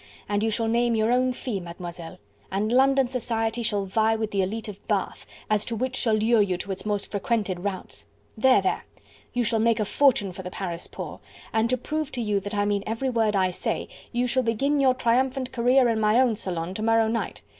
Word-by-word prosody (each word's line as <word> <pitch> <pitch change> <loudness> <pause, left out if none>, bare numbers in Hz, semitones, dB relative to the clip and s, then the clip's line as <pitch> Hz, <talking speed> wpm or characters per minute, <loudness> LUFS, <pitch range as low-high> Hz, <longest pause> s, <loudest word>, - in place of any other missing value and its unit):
and 205 0 0
you 225 - +1
shall 225 +1 0
name 235 +1 +2
your 220 +1 +2
own 255 +1 +3
fee, 245 -4 -4
Mademoiselle... 170 -1 -8 0.3
and 205 +3 0
London 270 +1 +4
society 235 -2 -2
shall 210 -3 0
vie 220 +3 +2
with 220 -1 -3
the 195 - +1
elite 215 +5 -3
of 205 -2 -10
Bath, - - -2 0.2
as 215 -1 +1
to 230 - -3
which 255 +3 -2
shall 225 -4 +2
lure 220 +1 +3
you 190 -3 +1
to 195 +2 -5
its 195 - -5
most 205 -1 -2
frequented 200 -2 -1
routs.... 190 0 -5 0.3
There! 245 -2 +4
there! 190 - -1 0.5
you 245 - +1
shall 225 0 +1
make 230 0 +2
a 215 - +1
fortune 235 -5 +3
for 185 - -8
the 180 - -6
Paris 175 -2 -5
poor... - - -7 0.3
and 225 +1 +2
to 255 - +2
prove 305 +4 -3
to 245 - -2
you 210 -2 +1
that 205 +1 -5
I 205 0 +1
mean 205 -1 0
every 230 +4 -1
word 220 -3 +1
I 185 -1 +2
say, - - -3 0.2
you 245 0 0
shall 260 +1 +1
begin 270 +5 +1
your 260 -2 +4
triumphant 255 +2 +1
career 250 +1 +4
in 225 -2 +1
my 215 +2 +4
own 250 -4 +3
salon 180 -4 -3
to 215 - -5
morrow 225 0 +3
night. 230 +1 -3
225 Hz, 220 wpm, -25 LUFS, 205-245 Hz, 0.5 s, London